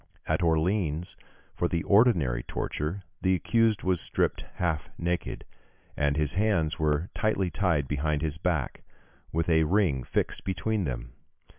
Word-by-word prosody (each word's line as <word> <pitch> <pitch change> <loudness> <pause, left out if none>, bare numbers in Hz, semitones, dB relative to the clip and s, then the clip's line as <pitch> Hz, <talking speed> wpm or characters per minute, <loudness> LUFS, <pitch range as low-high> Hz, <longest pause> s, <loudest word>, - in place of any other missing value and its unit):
At - - 0
Orleans, 85 0 +1 0.4
for 85 - 0
the 85 -1 -1
ordinary 100 - +4
torture 80 +7 -3 0.2
the 95 0 +3
accused 115 +2 +2
was 90 -2 +1
stripped - - -1
half 80 -4 -1
naked, 85 +1 -2 0.5
and 70 0 +1
his 75 -2 +1
hands 95 -6 +1
were 75 +3 0
tightly 100 -4 0
tied 85 -8 +1
behind 75 +2 -1
his 80 0 -2
back, 85 -7 -1 0.5
with 80 +1 0
a 80 -2 +4
ring 80 -7 +2
fixed - - -2
between 100 +1 -1
them. - - -5
85 Hz, 140 wpm, -28 LUFS, 75-95 Hz, 0.5 s, ordinary